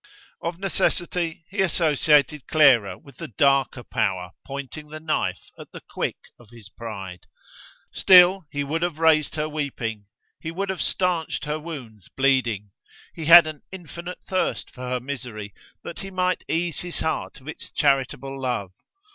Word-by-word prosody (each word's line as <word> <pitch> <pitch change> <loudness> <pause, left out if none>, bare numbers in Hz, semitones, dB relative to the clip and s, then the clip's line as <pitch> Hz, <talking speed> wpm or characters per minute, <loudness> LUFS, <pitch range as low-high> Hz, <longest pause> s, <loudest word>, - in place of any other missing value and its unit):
Of 170 0 -3
necessity 175 -2 -1
he 200 0 0
associated 150 -4 +2
Clara 120 - +5
with 140 -3 -17
the - - -6
darker 135 +2 +2
Power 90 -6 -1 0.2
pointing 140 +2 -7
the 155 +1 -7
knife 155 0 -2
at - - -10
the - - -9
quick - - -3 0.2
of 120 -3 -18
his 115 -4 -13
pride. 100 -6 -8 0.7
Still, 185 -1 +7
he 145 0 -2
would 155 +4 -2
have 175 -3 -1
raised 160 -2 +3
her 155 0 -1
weeping: 120 -9 -4 0.3
he 160 - -5
would 190 +4 -2
have 190 - -4
stanched 175 -5 0
her 150 +1 -2
wounds 130 - -9
bleeding: 120 -7 +1 0.4
he 160 - -6
had 170 +1 +10
an 155 -2 -6
infinite 175 -1 -8
thirst 185 -1 -1
for 125 -1 -7
her 125 0 0
misery, 120 -6 -6 0.3
that - - -7
he 195 - -6
might 185 -1 0
ease 170 -1 -1
his 175 -1 -5
heart 160 -1 -2
of 135 - -18
its 160 - -7
charitable 135 -1 0
love. 120 -8 -2
150 Hz, 155 wpm, -24 LUFS, 125-170 Hz, 0.7 s, had